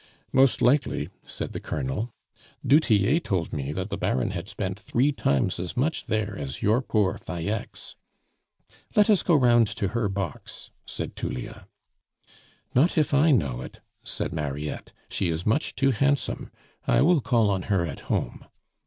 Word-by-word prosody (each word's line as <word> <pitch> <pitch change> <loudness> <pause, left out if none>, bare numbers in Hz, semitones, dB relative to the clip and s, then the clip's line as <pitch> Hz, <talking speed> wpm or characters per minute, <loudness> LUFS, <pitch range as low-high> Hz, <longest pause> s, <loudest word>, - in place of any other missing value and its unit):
"Most 130 -2 +4
likely," 125 - +2
said - - -5
the - - -4
Colonel. 75 - -3 0.6
"Du 145 +3 +6
Tillet 125 - +2
told 90 -4 -1
me 70 -2 -3
that - - -4
the - - -2
Baron 65 - 0
had 85 +3 -5
spent 95 -2 -4
three 125 +6 +1
times 70 - 0
as 90 +4 -5
much 145 +1 0
there 110 -2 -1
as 70 -1 -5
your 110 +5 +3
poor 105 -7 0
Falleix." 95 +5 -5 1.0
"Let 210 +1 +5
us 200 - +4
go 170 - +3
round 120 -4 +5
to 100 - -1
her 115 -2 0
box," 95 -5 -5 0.2
said - - -5
Tullia. - - -5 1.1
"Not 155 +9 +3
if 150 -2 +2
I 145 +3 +5
know 70 - +2
it," - - -10 0.2
said - - -3
Mariette; 75 0 -4 0.2
"she 95 - -1
is 80 +1 -2
much 110 +9 0
too 135 0 +3
handsome, 140 +4 0 0.4
I - - +4
will 165 -1 +4
call 115 -5 +2
on 95 -1 0
her 95 -4 +2
at 75 -4 -6
home." - - -2
105 Hz, 160 wpm, -26 LUFS, 85-135 Hz, 1.1 s, Du